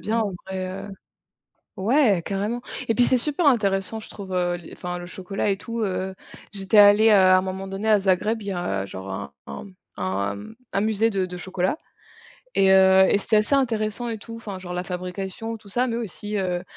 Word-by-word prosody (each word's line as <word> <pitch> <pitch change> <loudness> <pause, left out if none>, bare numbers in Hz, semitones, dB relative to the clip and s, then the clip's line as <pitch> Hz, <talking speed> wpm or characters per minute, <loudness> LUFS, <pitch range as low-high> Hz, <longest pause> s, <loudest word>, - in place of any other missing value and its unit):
bien 225 +2 -1
en 215 -3 0 0.2
vrai, 185 -1 -3
heu 190 +2 -6 0.9
ouais, 215 - +3
carrément, 205 +5 -2 0.3
et 225 - +2
puis 245 +2 +4
c'est 255 - +3
super 295 +6 0
intéressant 200 -4 +2
je - - -13
trouve, 195 -2 -8
heu, 175 -1 +1
les 175 - -11
enfin 180 0 -5
le 175 - -8
chocolat 195 +3 -3
et 195 - +2
tout, 230 +3 -5
heu, 190 -2 -2 0.4
j'étais 195 +1 -1
allée, 205 +2 +8
heu, - - +6
à 185 -1 +6
un - - +3
moment 190 +1 -5
donné 195 +3 -3
à 210 -2 +5
Zagreb, 205 +4 +1
il 200 - -7
y - - -1
a 100 - -2
genre 95 0 -8
un 70 -7 -5
un 70 - -7
mmh 195 -2 -14 0.2
un, 100 +2 -1
hem, 100 - -9 0.2
un 195 - +2
musée 220 +1 +2
de 195 -3 0
de 180 0 -6
chocolat 185 - -1 0.8
et 190 0 +5
heu 190 0 +7
et - - +3
c'était 215 - 0
assez 210 +6 +2
intéressant 230 -3 0
et 225 - -3
tout 230 +2 -10
enfin 205 -4 -7
genre 180 -1 -7
la 180 0 -2
fabrication 190 +5 -5
et - - -8
tout 205 - -16
ça, 245 +5 +1
mais 230 -2 -2
aussi, 210 -1 -5
heu, 180 -2 -1
195 Hz, 220 wpm, -24 LUFS, 185-220 Hz, 0.9 s, allée